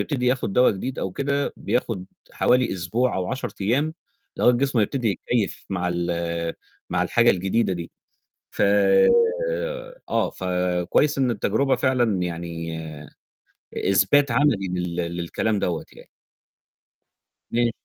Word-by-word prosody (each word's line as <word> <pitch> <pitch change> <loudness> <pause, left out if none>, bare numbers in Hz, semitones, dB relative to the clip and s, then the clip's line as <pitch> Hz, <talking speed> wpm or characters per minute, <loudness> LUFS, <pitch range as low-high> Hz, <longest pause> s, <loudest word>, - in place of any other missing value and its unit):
يبتدي 130 -5 -1
ياخد 125 -5 0
دوا 125 +4 +5
جديد 125 +7 -4
أو 95 - -2
كده 140 +5 -1
بياخد 110 -7 -2 0.3
حوالي 125 0 +2
أسبوع 110 +8 -1
أو 95 -1 -1
10 130 0 -3
أيام 135 +11 +1 0.4
لغاية 125 - +5
جسمه 130 +1 +1
ما - - +5
يبتدي 120 +2 -1
يتكيف 105 +3 -2
مع 90 -2 -1
ال 85 -1 -2 0.4
مع 90 +1 +1
الحاجة 115 +6 +4
الجديدة 95 +4 +1
دي 85 -2 -5 0.6
ف - - -2 1.5
آه، - - +1
فكويس 90 - 0
إن 130 -2 +2
التجربة 125 +5 +1
فعلًا 120 -8 +1
يعني 85 -1 -4 1.0
إثبات 100 +8 +3
عملي 115 -7 +2
لل 90 -1 -3 0.2
للكلام 100 +5 -1
دوّة 85 -2 -2
يعني. - - -15 1.4
امم. 120 0 +2
100 Hz, 125 wpm, -23 LUFS, 90-125 Hz, 1.5 s, دوا